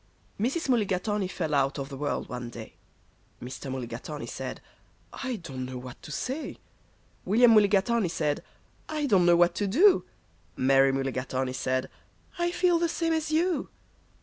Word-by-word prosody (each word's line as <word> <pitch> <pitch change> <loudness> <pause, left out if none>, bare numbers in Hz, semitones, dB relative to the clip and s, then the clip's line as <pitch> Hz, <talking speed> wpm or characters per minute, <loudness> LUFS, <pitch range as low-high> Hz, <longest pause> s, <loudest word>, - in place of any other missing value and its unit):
Mrs. 270 +10 0
Mulligatawny 205 -4 +1
fell 160 -4 -3
out 140 0 +2
of 135 -1 -4
the 140 - -7
world 145 +1 -2
one 125 -1 -5
day. 115 -2 -9 0.7
Mr. 130 +2 -7
Mulligatawny 130 +3 -5
said, - - -6 0.5
"I 260 -2 -3
don't 135 - -6
know 130 0 -5
what 125 0 -9
to - - -10
say." 265 - -4 0.7
William 230 +5 +5
Mulligatawny 210 0 +4
said, 150 -3 -1 0.5
"I 305 -1 -1
don't 190 -9 +4
know 175 - +7
what 175 0 +4
to 205 - -1
do." 355 - +5 0.5
Mary 135 +1 +4
Mulligatawny 130 -1 -2
said, 130 0 -1 0.5
"I 345 0 +2
feel 350 -1 +2
the 340 0 +1
same 330 0 0
as 315 -1 -1
you." 340 +2 +1
175 Hz, 150 wpm, -28 LUFS, -, 0.7 s, know